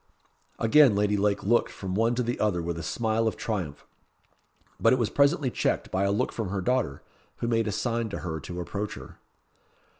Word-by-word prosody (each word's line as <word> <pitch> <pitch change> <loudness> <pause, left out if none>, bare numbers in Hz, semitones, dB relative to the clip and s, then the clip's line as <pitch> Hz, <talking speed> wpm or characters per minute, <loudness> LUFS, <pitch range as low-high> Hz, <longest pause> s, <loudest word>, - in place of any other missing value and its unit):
Again 125 0 +5
Lady 105 0 +2
Lake 100 0 +1
looked 120 +4 +2
from 95 -2 -5
one 115 +4 +2
to 125 - 0
the 120 +1 -2
other 105 -5 +1
with 85 0 -3
a - - -4
smile 110 +6 0
of 110 - -2
triumph. 90 -10 -4 0.9
But 115 - +5
it - - +5
was 115 -4 0
presently 140 -2 +3
checked - - -1
by 95 +1 +1
a 100 - +2
look 100 - 0
from 110 -5 -4
her 100 0 -2
daughter, 115 - -1 0.3
who 115 - -3
made 115 -1 +1
a - - 0
sign 115 +2 -1
to 100 - -5
her 80 -2 -3
to 90 +5 -7
approach 100 +4 -4
her. - - -12
105 Hz, 205 wpm, -27 LUFS, 95-115 Hz, 0.9 s, Again